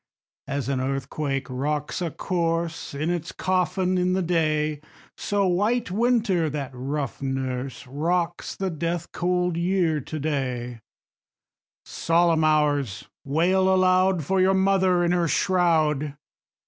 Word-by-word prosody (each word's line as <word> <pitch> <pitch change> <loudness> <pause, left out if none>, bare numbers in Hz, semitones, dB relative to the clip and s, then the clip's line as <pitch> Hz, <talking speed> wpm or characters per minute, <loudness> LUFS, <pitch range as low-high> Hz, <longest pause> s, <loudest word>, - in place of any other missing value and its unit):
2. 140 - -4
As 140 -3 -2
an 135 -2 0
earthquake 135 +1 -2
rocks 145 +6 -2
a 170 - -1
corse 165 -2 -2
In 155 +4 -1
its 175 -1 -3
coffin 185 0 0
in 180 0 +1
the 190 0 +1
clay, 155 -3 0 0.3
So 205 -1 0
White 205 +4 +1
Winter, 215 -6 +2
that 140 -2 -4
rough 135 +2 -4
nurse, 130 -1 -3
Rocks 170 +6 -2
the 190 -1 -2
death 170 +2 -3
cold 180 -1 0
Year 170 -3 +1
to 155 +4 -6
day; 125 -5 -2 1.1
_10 - - -21
Solemn 165 -1 +2
Hours! 145 -8 +1
wail 185 +6 +2
aloud 185 -1 +3
For 190 +4 +2
your 190 +1 +4
mother 190 -2 +3
in 170 - +1
her 175 -1 +2
shroud. 155 -6 +1
165 Hz, 135 wpm, -25 LUFS, 145-185 Hz, 1.1 s, your